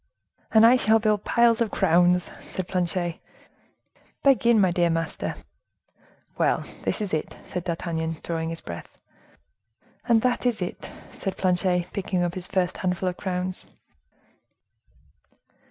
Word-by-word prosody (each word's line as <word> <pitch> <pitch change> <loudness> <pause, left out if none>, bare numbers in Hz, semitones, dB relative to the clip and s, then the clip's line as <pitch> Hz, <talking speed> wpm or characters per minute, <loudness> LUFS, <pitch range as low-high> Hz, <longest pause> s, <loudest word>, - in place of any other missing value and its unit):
"And 220 0 +7
I 245 +2 +7
shall 220 -2 +4
build 215 -2 +1
piles 235 -1 +3
of 230 - +2
crowns," 175 +1 +3 0.2
said 185 -2 -4
Planchet. 175 -2 -2 1.0
"Begin, 235 -5 +5
my 190 -3 +4
dear 175 0 +2
master." 165 0 -2 1.0
"Well, - - +2 0.2
this - - -2
is 205 -5 -3
it," 155 - -2
said 180 - -5
D'Artagnan, 165 -2 -2
drawing 165 -1 -2
his 165 0 -6
breath. 85 0 -9 1.1
"And 230 -2 +3
that 250 0 +1
is 235 -3 0
it," 180 -1 -5 0.2
said 195 - -4
Planchet, 180 -1 0
picking 185 -2 -1
up 175 -1 -1
his 185 -1 -6
first 185 -2 0
handful 185 0 -1
of 180 - -7
crowns. 185 -1 -3
180 Hz, 135 wpm, -25 LUFS, 175-215 Hz, 1.1 s, And